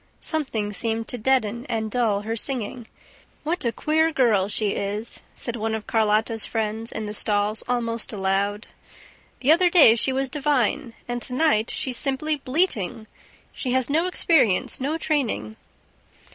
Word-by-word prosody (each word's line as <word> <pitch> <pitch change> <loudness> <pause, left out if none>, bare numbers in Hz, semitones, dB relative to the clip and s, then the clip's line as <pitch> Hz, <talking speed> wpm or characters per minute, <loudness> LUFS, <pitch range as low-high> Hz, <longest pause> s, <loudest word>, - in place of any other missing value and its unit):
Something 230 -10 -2
seemed 225 +1 -2
to 245 - 0
deaden 235 -1 +1
and 220 -2 -2
dull 220 -4 +1
her 225 +2 -3
singing... 235 -1 -2 0.6
"What 330 +4 -1
a 235 - +1
queer 315 +7 +1
girl 225 -9 +2
she 210 0 0
is!" 205 +3 -3 0.2
said 235 - -4
one 220 -1 -2
of 220 - -6
Carlotta's 220 0 +1
friends 220 0 -2
in 220 - -4
the 210 - -5
stalls, 210 0 +1
almost 230 -2 0
aloud. 200 +1 -1 0.8
"The 270 - +4
other 350 +2 +5
day 330 -10 +7
she 235 +3 +1
was 265 +1 -1
divine; 280 -2 0
and 240 0 -3
to 250 - -4
night 255 -7 +2
she's 255 -3 -1
simply 295 +2 0
bleating. 255 - -1 0.5
She 250 -2 -3
has 260 +1 0
no 325 +4 +2
experience, 260 - +2
no 295 +5 -1
training." 245 - -1
235 Hz, 155 wpm, -24 LUFS, 215-270 Hz, 0.8 s, day